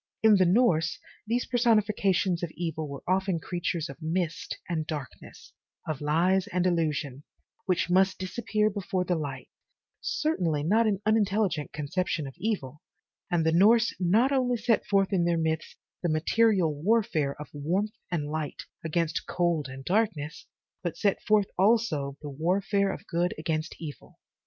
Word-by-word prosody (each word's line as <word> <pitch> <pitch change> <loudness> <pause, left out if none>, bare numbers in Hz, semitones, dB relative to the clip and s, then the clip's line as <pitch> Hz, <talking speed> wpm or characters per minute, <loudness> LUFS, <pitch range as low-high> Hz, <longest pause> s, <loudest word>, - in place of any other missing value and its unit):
In 215 -2 +7
the 185 -2 +4
Norse, 175 -6 +3 0.3
these 240 +2 0
personifications 210 -7 +2
of 175 - -2
evil 160 -2 -3
were 140 -1 -8
often 190 -1 +1
creatures 170 -1 -2
of - - -11
mist 165 +1 -2
and 160 -3 -2
darkness, 145 -5 -8 0.3
of 155 -3 -3
lies 175 +6 +2
and 180 0 0
illusion, 150 -6 -1 0.4
which 185 -2 +1
must 190 +2 +3
disappear 210 +3 -1
before 190 -2 -2
the 180 - +1
light, 140 -6 -4 0.5
certainly, 170 - 0
not 220 +8 +3
an 205 -1 -1
unintelligent 205 -7 +1
conception 155 +1 -2
of 135 - -7
evil, 150 - -3 0.5
and 170 -3 +1
the 160 - +3
Norse 220 +7 +5
not 215 +9 +3
only 250 -3 +2
set 230 0 +1
forth 195 0 +2
in 180 -3 +3
their 170 0 +2
myths 160 -1 -2 0.3
the 175 - 0
material 175 +2 +2
warfare 155 -5 0
of 150 - -8
warmth 180 +9 -1 0.2
and 165 -5 -1
light 155 -2 -4 0.2
against 165 0 -1
cold 170 -4 0
and 135 +1 -9
dark 215 +4 +3
ness, 150 +1 -8 0.3
but 175 -3 -3
they 205 - +3
set - - -12
forth 210 -2 +2
also 185 -10 +2
the 145 - -5
warfare 195 +6 +1
of - - -8
good 175 +2 -1
against 155 0 -2
evil. 150 -4 -9
175 Hz, 155 wpm, -28 LUFS, 155-205 Hz, 0.5 s, In